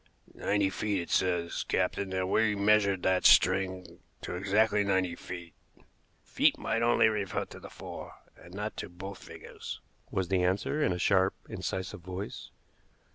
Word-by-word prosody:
"Ninety 100 -1 +1
feet, 105 -1 -1
it 85 - -5
says, 90 -2 +1
captain; 100 -1 -1
and 95 0 -1
we 110 -1 +3
measured 100 -2 +3
that 95 0 +2
string 95 -3 +4 0.2
to - - -4
exactly 105 +3 +2
ninety 95 -3 +1
feet." 85 -3 -8 0.7
"Feet - - +2
might 115 - -1
only 120 -1 +4
refer 105 -3 -1
to - - -12
the - - -10
four, - - -9 0.2
and 85 - -15
not 105 +3 -4
to - - -5
both 95 +2 -9
figures," - - -9 0.3
was 95 -2 -2
the 95 -2 +2
answer 100 +11 0
in 120 - +2
a 90 - -1
sharp, 95 +1 +3
incisive 95 -1 -4
voice. 95 +3 -6
95 Hz, 155 wpm, -30 LUFS, 90-105 Hz, 0.7 s, string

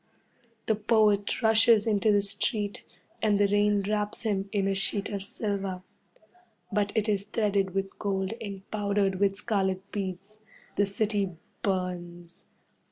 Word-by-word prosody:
The 220 - +3
poet 210 0 +2
rushes 225 0 +5
into 215 -1 +3
the 205 -1 +3
street, 205 0 -1 0.4
and 210 -2 +3
the 205 - +5
rain 205 0 +2
wraps 210 +1 -1
him 200 -3 -1
in 200 -2 +1
a 195 - +1
sheet 195 +1 0
of 200 -2 -4
silver. 195 -3 -3 0.9
But 205 0 +1
it 220 -1 +1
is 200 -2 0
threaded 200 -3 0
with 195 0 -3
gold 195 -1 -1
and 200 -2 -7
powdered 200 -2 0
with 195 -1 +2
scarlet 195 -3 -1
beads. 195 +1 -5 0.4
The 205 - +2
city 200 -2 -1 0.3
burns. 175 -3 -3
200 Hz, 140 wpm, -28 LUFS, 195-210 Hz, 0.9 s, rushes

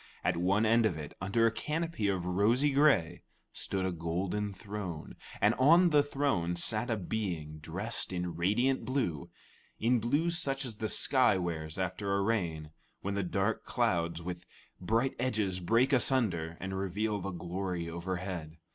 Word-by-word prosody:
At 90 - +1
one 95 +6 +2
end 115 0 +4
of 90 -7 -3
it, 75 -2 -7
under 100 +4 +2
a 115 - +4
canopy 155 -2 -2
of 95 -3 -1
rosy 110 +10 +2
gray, 125 - +3 0.3
stood 95 -1 -1
a 95 - 0
golden 90 +5 -2
throne, 100 -5 -6 0.2
and - - +4
on 170 +6 +6
the 150 -1 +6
throne 135 -12 0
sat 110 +7 +1
a 115 - +1
being 85 -7 -4
dressed 95 +10 -3
in 90 -2 -3
radiant 105 +10 +1
blue 110 - -2 0.5
in 120 +2 +2
blue 145 +9 +1
such 140 -5 -1
as 115 -4 -7
the 110 0 -2
sky 130 -7 +4
wears 80 -3 -3
after 95 +2 -1
a 100 - +1
rain, 85 -8 -1 0.3
when 100 - -2
the 100 - 0
dark 95 +4 -1
clouds 85 -8 0
with 90 0 -5 0.4
bright 115 +8 +1
edges 105 -7 0
break 115 +9 +2
asunder 95 -12 +1
and 95 0 -4
reveal 105 +3 -1
the 100 - -3
glory 90 0 -4
overhead. 85 -1 -5
100 Hz, 160 wpm, -31 LUFS, 85-115 Hz, 0.5 s, on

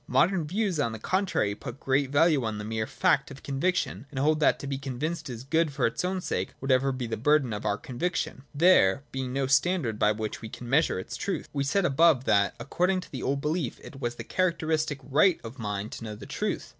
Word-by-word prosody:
Modern 160 +6 +2
views, 190 -1 -1
on 115 -6 0
the - - -5
contrary, 185 - 0
put 120 +4 -8
great 135 0 +1
value 145 -1 +3
on 110 -2 -2
the 105 - -5
mere 110 0 -2
fact 185 -2 +2
of 135 -1 -11
conviction, 140 - -1
and 140 - -10
hold 150 +3 +2
that 150 - +4
to - - -8
be 135 -1 -3
convinced 150 +4 -4
is 120 -1 -6
good 160 +3 +1
for 135 -2 0
its 115 - -1
own 185 +1 -1
sake, - - -2
whatever 135 0 +2
be 130 -2 -3
the 115 - -3
burden 140 -1 +2
of 105 - -5
our 100 - +1
conviction, 130 - -3
— - - -25
there 135 - +5
being 130 -1 -3
no 135 +1 0
standard 140 - +1
by 105 - +4
which 110 0 -4
we 110 - -7
can 120 - -9
measure 150 - +2
its 95 +5 -6
truth. 190 +11 -3
We 140 -1 0
said 175 +7 +1
above 150 -2 +4
that, 100 -5 +2
according 180 +9 0
to - - -14
the 130 - -5
old 140 +1 -1
belief, 150 -2 -2
it 135 - -10
was 120 -1 -2
the 115 - -7
characteristic 160 -2 0
right 155 +7 +3
of 115 +3 -8
the - - -8
mind 105 0 -3
to - - -7
know 105 -2 -5
the - - -10
truth. - - -3
135 Hz, 235 wpm, -27 LUFS, 120-160 Hz, -, there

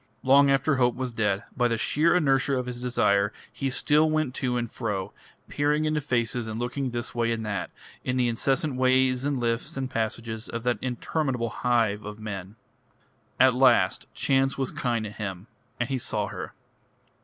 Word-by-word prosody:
Long 140 +2 +6
after 135 +1 +2
hope 125 -2 +3
was 130 -1 -3
dead, 105 -3 0
by 125 -2 +2
the 115 -1 0
sheer 160 +9 +2
inertia 135 -4 +2
of 125 - -2
his 125 -1 -6
desire 105 -5 +2 0.2
he 135 - -2
still 150 +4 +3
went 155 -4 0
to 125 -2 -1
and 120 -1 -3
fro, 100 -4 -3 0.3
peering 150 +1 +1
into 155 -1 0
faces 120 -3 -1
and 110 0 -4
looking 125 +2 -2
this 120 -1 -4
way 115 -1 0
and 110 -1 -2
that, 100 -4 -3 0.3
in 125 0 -1
the 125 -1 +2
incessant 135 +4 0
ways 130 0 +3
and 145 -1 0
lifts 115 +2 -2
and 130 -1 -3
passages 110 0 -3
of 115 0 -4
that 120 -4 0
interminable 125 -1 -2
hive 115 -4 +1
of 105 0 -7
men. 100 -2 -6 0.8
At 130 -1 +6
last 130 +1 +3
chance 135 0 +2
was 135 -2 -1
kind 120 -3 -1
to 105 - -6
him, 95 -3 -6 0.3
and 120 - 0
he 135 -1 -2
saw - - 0
her. - - -7
125 Hz, 180 wpm, -26 LUFS, 115-135 Hz, 0.8 s, Long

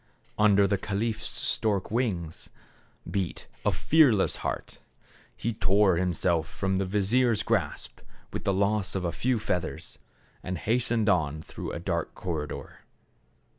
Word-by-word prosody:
Under 100 -1 +5
the 100 0 +1
caliph's 110 +3 -2
stork 100 -3 -1
wings 95 -9 -2 0.6
beat 95 -5 -3 0.2
a - - +3
fearless 140 -11 +4
heart. - - -4 0.6
He 115 - -2
tore 95 -1 +3
himself 85 -2 +1
from 95 +2 -1
the 95 0 0
vizier's 105 +4 +2
grasp - - -1 0.3
with - - -4
the 100 - +2
loss 100 +1 +1
of 95 -2 -1
a 85 - 0
few 125 +5 0
feathers, 90 -5 -3 0.4
and 90 0 -4
hastened 115 +1 +1
on 80 -6 +1
through - - -6
a - - -3
dark - - -2
corridor. 80 -4 -5
100 Hz, 135 wpm, -28 LUFS, 90-110 Hz, 0.6 s, Under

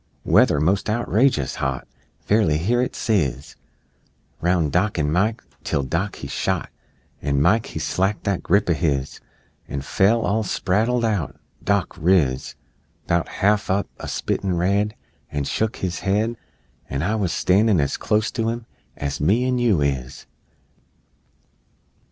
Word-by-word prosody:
Weather 75 - +4
most 95 +8 +1
outrageous 110 - +1
hot! - - -2 0.3
Fairly 100 -8 +2
hear 115 +10 +1
it 125 - -2
sizz 75 - -1 0.9
Roun' 85 -3 +2
Dock 95 +4 +1
an' 75 -2 +1
Mike 105 +7 +1 0.2
till 70 - 0
Dock 85 +9 -2
he 70 - -7
shot, - - -2 0.5
An' 70 0 0
Mike 110 +10 +3
he - - -7
slacked 95 +3 -1
that 100 -3 -1
grip 100 +4 +2
o' 85 - +3
his 70 -5 -1 0.5
An' 70 - -4
fell, 100 +11 +2
all 110 +1 +1
spraddled 110 +4 0
out. 105 -9 -1 0.3
Dock - - 0
riz 75 -7 +2 0.5
'Bout 85 0 +1
half 100 0 +1
up, 100 +2 +1
a - - -6
spittin' 95 -3 -1
red, 100 +4 +1 0.4
An' 70 -1 -2
shuck 110 +9 -1
his 90 -2 -3
head 105 +4 0 0.5
An' 70 +2 -2
I 100 +6 0
wuz 105 -4 0
a 85 - -2
standin' 100 0 +3
as 70 -2 0
clost 105 +1 0
to 115 -1 +1
'em 115 0 -4 0.3
As 70 -1 -3
me 105 +11 +3
an' 125 -1 +1
you 110 -10 +3
is! 70 -2 -2
95 Hz, 150 wpm, -22 LUFS, 75-110 Hz, 0.9 s, Weather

